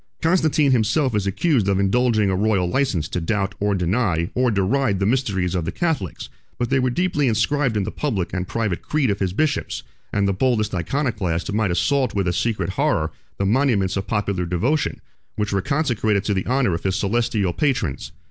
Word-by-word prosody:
Constantine 160 -4 +3
himself 130 +3 +2
is 105 -2 0
accused 115 - +1
of 100 -1 +2
indulging 110 0 +2
a - - 0
royal 100 -2 +1
license 90 - 0
to 90 - -3
doubt, 95 +2 -1
or 100 0 +1
deny, 90 -2 0
or 125 0 +2
deride 105 +2 +1
the 95 - +1
mysteries 100 -7 0
of 90 -2 -1
the 80 - -3
Catholics, 160 - -2
20 - - -15 0.3
but 120 -1 -1
they 135 - +3
were 130 0 +1
deeply 150 0 0
inscribed 120 +2 +1
in 100 - +1
the 105 - -4
public 105 -12 -2
and 90 -1 -2
private 110 -6 -2
creed 150 -7 0
of 100 - -2
his 95 -2 0
bishops; 145 +8 -1 0.3
and 100 -1 +1
the 100 - +1
boldest 110 -1 +1
Iconoclast 95 - -1
might 105 -2 +1
assault 130 - +1
with 100 -2 0
a 85 - +1
secret 100 -3 -1
horror 95 - 0 0.3
the 100 - 0
monuments 105 -4 +2
of 100 0 -3
popular 100 -4 -1
devotion, 120 - 0 0.3
which 105 -1 -2
were 100 - +1
consecrated 110 -7 0
to 105 - 0
the 95 -1 -2
honor 125 -7 +2
of 85 - -2
his 95 -1 -1
celestial 105 -3 0
patrons. 125 - -1
105 Hz, 195 wpm, -22 LUFS, 95-130 Hz, 0.3 s, Constantine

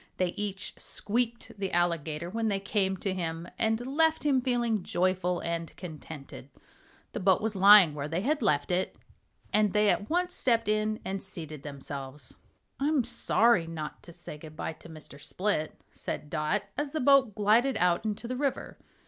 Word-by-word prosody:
They 185 -1 +1
each 200 +1 -3
squeaked 235 +2 -2
the 195 -1 -2
Alligator 170 -2 0
when 225 +1 -1
they 200 -2 0
came 195 -1 0
to 190 +1 -2
him, 165 -2 -3
and 225 +1 +1
left 320 +4 +2
him 270 -3 +3
feeling 240 -4 0
joyful 180 0 0
and 170 -1 -4
contented. 155 -5 -9 0.6
The - - -4
boat 190 -1 +4
was 220 -1 -1
lying 195 -4 +8
where 145 -1 -4
they 165 +4 -2
had 290 +6 0
left 150 -7 +1
it, 180 +1 0 0.6
and 210 -2 +3
they 210 0 +4
at 205 - 0
once 360 +2 +1
stepped 230 -3 +2
in 215 0 +1
and 195 0 -3
seated 160 -6 -7
themselves. 140 0 -7 0.5
"I'm 285 -1 +2
sorry 220 -6 +3
not 155 -2 -6
to 170 - -12
say 150 -2 -8
good 155 0 -11
bye 160 - -4
to 160 - -15
Mr. 155 -3 -11
Split," 180 -5 -2
said 150 - -6
Dot, 155 +7 0 0.2
as 290 -1 -3
the 315 - -1
boat 265 -5 +4
glided 225 +6 +3
out 175 +1 +2
into 215 +2 -3
the 255 - -3
river. 275 0 -2
195 Hz, 175 wpm, -29 LUFS, 165-230 Hz, 0.6 s, lying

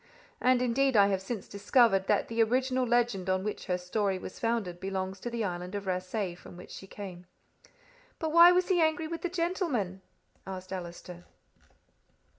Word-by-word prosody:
And 250 0 +3
indeed 255 +1 +2
I 200 0 +6
have 190 -1 0
since 200 +1 -5
discovered 200 -1 +3
that 205 - +2
the 230 0 0
original 255 +2 +1
legend 235 -6 +1
on 185 0 +1
which 210 0 -4
her 180 -2 +1
story 190 +2 -1
was 185 - -9
founded 225 -7 -1
belongs 190 0 -3
to 240 - -4
the 235 -1 -2
island 180 0 -4
of 200 -1 -4
Rasay, 185 +1 -2
from 175 0 -13
which 180 - -12
she 195 - -9
came. 185 -3 -9 0.9
"But 320 -1 -2
why 340 +2 +9
was 360 +1 +2
he 360 -3 +3
angry 315 0 +2
with 335 +1 -5
the 355 - -2
gentleman?" 335 - -1 0.5
asked 185 0 -6
Allister. 175 -1 -8
205 Hz, 175 wpm, -30 LUFS, 185-255 Hz, 0.9 s, why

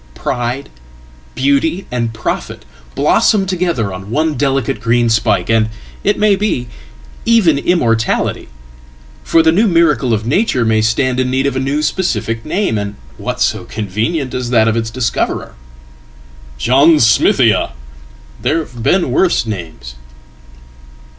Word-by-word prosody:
Pride, 125 +3 -3 0.7
beauty, 140 +7 +1
and 120 -2 -1
profit 110 -1 -4 0.3
blossom 200 -3 +3
together 170 - -1
on 95 +1 -8
onedelicate 135 -3 0
green 115 +1 +2
spike, 110 -1 +1
and, 110 -1 +2 0.3
it 205 - +1
may 210 -1 +3
be, 195 -11 -1 0.6
even 195 -11 +3
immortality. 120 -10 0 0.8
For 165 - +3
the 160 - +4
newmiracle 165 - +2
of 110 -1 0
nature 135 - +1
may 110 -1 +2
stand 125 +3 0
in 130 0 0
need 130 +1 0
of 140 - -1
a - - 0
new 140 +3 -1
specific 115 -11 -1
name, 175 - -1
and 100 0 -5 0.2
what - - -4
soconvenient 115 - -2
as 125 -1 -3
that 115 -2 +3
of 110 - +1
its 115 -1 -2
discoverer? 115 -1 -2 1.0
"John 140 - +4
smithia"! 115 - +3 0.7
There 160 - +1
have 125 -7 -6
beenworse 175 0 +2
names. 80 - -7
125 Hz, 125 wpm, -15 LUFS, 115-160 Hz, 1.0 s, the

